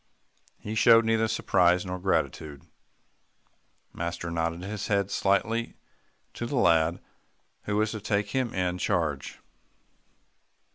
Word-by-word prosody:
He 105 - -6
showed 115 +1 +6
neither 110 0 +2
surprise 90 -4 +2
nor 90 0 -4
gratitude. 80 -6 -2 1.3
Master 85 0 -4
nodded 85 +1 -2
his 105 +1 -5
head 100 -1 0
slightly 110 +4 0 0.6
to 120 - -5
the 140 - -3
lad 85 -5 +3 0.7
who 105 - -1
was 110 0 +1
to 110 - -6
take 105 -1 -1
him 130 +1 -1
in 90 -1 -2
charge. 80 -6 -1
95 Hz, 115 wpm, -27 LUFS, 85-110 Hz, 1.3 s, showed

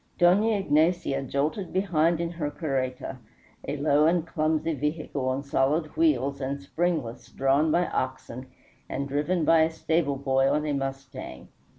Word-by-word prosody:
Dona 185 +5 +4
Ignacia 160 -5 +1
jolted 150 - -2
behind 170 -3 +1
in 170 0 -2
her 160 -4 -3
carreta, 135 -4 -3 0.5
a 145 - -2
low 145 +1 +3
and 170 -1 +2
clumsy 160 0 0
vehicle, 150 -2 -2
on 130 +2 -2
solid 145 +3 0
wheels 225 - +1
and 135 +1 -3
springless, 140 -6 -2
drawn 135 +5 +2
by 175 +2 +2
oxen, 130 -2 -4 0.4
and 140 +1 -3
driven 150 +4 0
by 165 0 +5
a 160 - +3
stable 160 -2 0
boy 135 0 +2
on 150 +2 0
a 150 - -1
mustang. 135 0 -6
150 Hz, 150 wpm, -26 LUFS, 135-165 Hz, 0.5 s, by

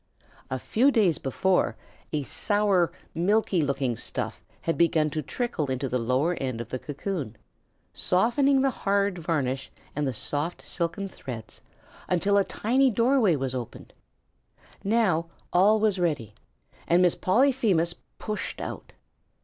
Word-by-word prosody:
A 130 - -2
few 235 - +2
days 205 - +3
before 185 +7 +1 0.4
a 150 -2 -1
sour, 190 +3 +2 0.2
milky 190 +1 +2
looking 140 -4 0
stuff - - -5 0.2
had 165 - -1
begun 160 -3 +2
to 155 - -2
trickle 205 - -3
into 130 +1 -1
the 125 0 -1
lower 130 +9 +1
end 130 -4 -2
of 115 -1 -6
the 130 - -3
cocoon, 145 - -4 0.6
softening 265 +8 +2
the 270 - +3
hard 200 -4 0
varnish 140 -6 -2 0.2
and 145 0 0
the - - 0
soft 150 +9 -3
silken 180 +3 -2
threads 115 - -9 0.5
until 195 +3 +3
a - - +3
tiny 260 +7 +2
doorway 235 - +3
was 135 -2 -2
opened. 125 -3 -7 0.9
Now 195 -6 +2 0.3
all 205 +5 +5
was 210 -3 +2
ready 145 - -1 0.5
and 175 +2 +4
Miss 180 - +4
Polyphemus 210 -6 +2 0.2
pushed 215 -1 -4
out. - - -7
175 Hz, 135 wpm, -26 LUFS, 140-210 Hz, 0.9 s, all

